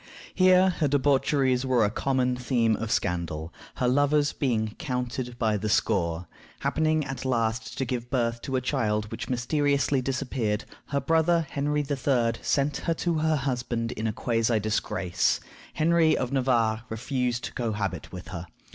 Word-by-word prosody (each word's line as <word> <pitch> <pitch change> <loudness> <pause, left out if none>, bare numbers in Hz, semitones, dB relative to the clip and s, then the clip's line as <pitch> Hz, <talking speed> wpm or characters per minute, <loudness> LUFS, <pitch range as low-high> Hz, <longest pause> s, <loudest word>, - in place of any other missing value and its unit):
Here 185 0 +5
her 155 - +3
debaucheries 135 -2 +2
were 125 -4 +3
a 105 - 0
common 125 0 0
theme 120 -3 +1
of 110 +1 -4
scandal, 85 -3 -2 0.2
her 125 - 0
lovers 145 +3 +3
being 110 -6 0
counted 125 -4 -3
by 110 -3 +1
the 105 +2 -2
score. 85 -4 +1 0.4
Happening 155 -1 +1
at 135 -1 -5
last 115 -3 -1
to 135 - 0
give 120 -1 -3
birth 120 -3 0
to 135 - -3
a 130 - +1
child 105 -5 -1
which - - -5
mysteriously 140 +1 +1
disappeared, 125 -4 -2 0.2
her 140 - 0
brother 165 +3 +2
Henry 145 +1 0
III. 130 -4 +1
sent 140 0 +1
her 165 - +1
to 170 -1 0
her 160 0 +2
husband 120 -4 -2
in 110 -1 -3
a - - 0
quasi 115 0 +1
disgrace. 95 -4 0 0.4
Henry 165 0 +3
of 125 0 -2
Navarre 120 -5 +2
refused 125 +1 -2
to - - -5
cohabit 105 -5 -3
with 90 -3 -8
her. 85 -1 -6
125 Hz, 155 wpm, -27 LUFS, 110-140 Hz, 0.4 s, Here